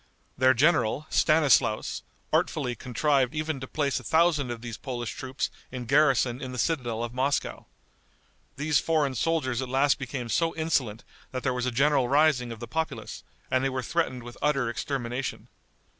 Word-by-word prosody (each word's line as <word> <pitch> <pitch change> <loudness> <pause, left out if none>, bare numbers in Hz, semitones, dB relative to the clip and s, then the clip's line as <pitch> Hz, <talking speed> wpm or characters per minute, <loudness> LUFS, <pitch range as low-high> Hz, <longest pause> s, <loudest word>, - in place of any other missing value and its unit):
Their 130 0 +4
general, 145 -1 +2
Stanislaus, 145 -8 +3 0.3
artfully 125 - +1
contrived 130 +3 0
even 155 -2 -2
to 130 - -7
place 140 -2 -1
a - - -13
thousand 160 -1 +2
of 120 -1 -5
these 120 -2 -6
Polish 120 -4 -5
troops 130 0 -4 0.2
in 125 -1 -5
garrison 130 -2 +3
in 130 - -5
the 125 - -6
citadel 120 -6 -1
of 120 0 -5
Moscow. 135 +3 -1 0.9
These 150 +1 +2
foreign 155 -4 +1
soldiers 130 -2 0
at 130 - -4
last 135 +2 +2
became 130 -2 -4
so 165 +7 +1
insolent 135 -9 -1 0.3
that 130 -1 -5
there 130 - +1
was 125 0 -2
a - - 0
general 135 +1 +3
rising 140 -4 +3
of 115 - -7
the 120 - -7
populace, 160 +5 -4 0.3
and 130 0 +2
they 135 - +2
were 130 -1 -3
threatened 130 -4 -1
with 120 0 -10
utter 135 -5 +1
extermination. 125 +1 -4
130 Hz, 170 wpm, -27 LUFS, 120-150 Hz, 0.9 s, Their